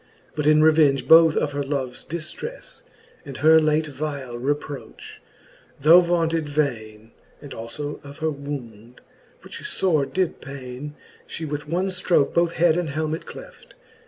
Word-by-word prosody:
But 150 Hz, -1 st, -1 dB
in 155 Hz, 0 st, +5 dB
revenge 150 Hz, -5 st, +4 dB
both 165 Hz, 0 st, +7 dB
of 145 Hz, -, 0 dB
her 145 Hz, 0 st, -3 dB
loves 135 Hz, -3 st, -4 dB
diftrefle, 170 Hz, -, -7 dB, 0.4 s
And 140 Hz, -3 st, -9 dB
her 160 Hz, +3 st, +6 dB
late 155 Hz, 0 st, +1 dB
vile 140 Hz, -3 st, -5 dB
reproch, 145 Hz, +2 st, -5 dB, 0.6 s
though 160 Hz, +5 st, +7 dB
vaunted 165 Hz, -3 st, 0 dB
vaine, 115 Hz, -7 st, -3 dB, 0.3 s
And 145 Hz, -, -10 dB
alio 145 Hz, +6 st, -6 dB
of 140 Hz, 0 st, -11 dB
her 160 Hz, -1 st, -1 dB
wound, 125 Hz, -5 st, -8 dB, 0.4 s
which -, -, -10 dB, 0.2 s
lore 155 Hz, -7 st, +2 dB
did 180 Hz, +4 st, -2 dB
paine, 135 Hz, +2 st, -8 dB, 0.3 s
She 160 Hz, -, -6 dB
with 145 Hz, 0 st, -5 dB
one 180 Hz, +4 st, 0 dB
ftroke 180 Hz, -5 st, +1 dB
both 170 Hz, 0 st, +2 dB
head 170 Hz, -1 st, +3 dB
and 175 Hz, -3 st, -2 dB
helmet 155 Hz, +2 st, -3 dB
cleft. -, -, -12 dB
150 Hz, 145 wpm, -23 LUFS, 135-160 Hz, 0.6 s, both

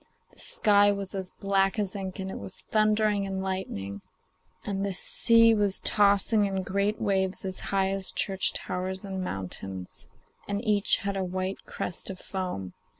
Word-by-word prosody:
The -, -, -22 dB
sky 205 Hz, -1 st, +4 dB
was 200 Hz, -1 st, -4 dB
as 190 Hz, -2 st, -4 dB
black 195 Hz, +1 st, 0 dB
as 205 Hz, -2 st, -2 dB
ink, 190 Hz, -1 st, -5 dB
it 190 Hz, 0 st, -5 dB
was 100 Hz, -1 st, -6 dB
thundering 215 Hz, -2 st, +2 dB
and 190 Hz, 0 st, -3 dB
lightening, 100 Hz, -, -4 dB, 0.6 s
and 195 Hz, -1 st, -2 dB
the 200 Hz, -1 st, -1 dB
sea 230 Hz, +4 st, +5 dB
was 205 Hz, -3 st, +2 dB
tossing 205 Hz, +1 st, +3 dB
in 190 Hz, -1 st, -2 dB
great 200 Hz, +3 st, -1 dB
waves 190 Hz, -2 st, +3 dB
as 185 Hz, -1 st, -4 dB
high 195 Hz, -1 st, +1 dB
as 195 Hz, -1 st, -2 dB
church 190 Hz, -1 st, 0 dB
towers 185 Hz, +1 st, -3 dB
and 190 Hz, -1 st, -4 dB
mountains, 95 Hz, -, -6 dB, 0.4 s
and 200 Hz, 0 st, -1 dB
each 210 Hz, -1 st, +4 dB
had 200 Hz, 0 st, -1 dB
a 195 Hz, -, -1 dB
white 185 Hz, +1 st, -4 dB
crest 180 Hz, -, -3 dB
of 190 Hz, -, -6 dB
foam. 180 Hz, -, -5 dB
195 Hz, 160 wpm, -27 LUFS, 185-205 Hz, 0.6 s, sea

